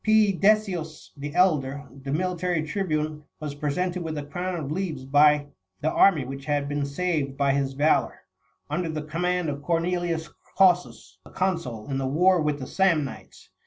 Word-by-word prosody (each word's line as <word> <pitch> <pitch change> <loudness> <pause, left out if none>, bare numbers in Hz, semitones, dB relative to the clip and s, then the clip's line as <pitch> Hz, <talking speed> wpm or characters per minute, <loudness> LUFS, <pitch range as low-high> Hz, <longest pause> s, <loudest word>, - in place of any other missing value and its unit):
P. 215 -1 +4
Decius 190 -5 +1
the 145 0 -6
elder, 145 -6 +2
the 135 0 -7
military 180 0 0
tribune, 155 -3 -2 0.2
was 150 -2 -5
presented 175 +5 -2
with 160 -2 -4
a 145 - -3
crown 180 +5 -3
of 145 -2 -5
leaves 160 -6 -3
by 145 +1 +5 0.4
the 155 - +1
army 160 -8 +4
which 135 +1 -7
had 145 -1 0
been 145 0 -2
saved 140 -3 -1
by 140 -1 +2
his 135 -1 0
valour, 150 +3 +1 0.5
under 175 -2 -2
the 155 -1 -3
com 155 +3 -5
mand 180 -1 +1
of 140 -1 -3
Cornelius 170 0 -1 0.3
Cossus,31 180 -2 +2
the - - -14
consul, 165 - -2
in 135 - -1
the 135 - -1
war 175 +5 +3
with 150 -1 0
the 130 - -5
Samnites. 165 -7 -1
155 Hz, 170 wpm, -25 LUFS, 145-180 Hz, 0.5 s, by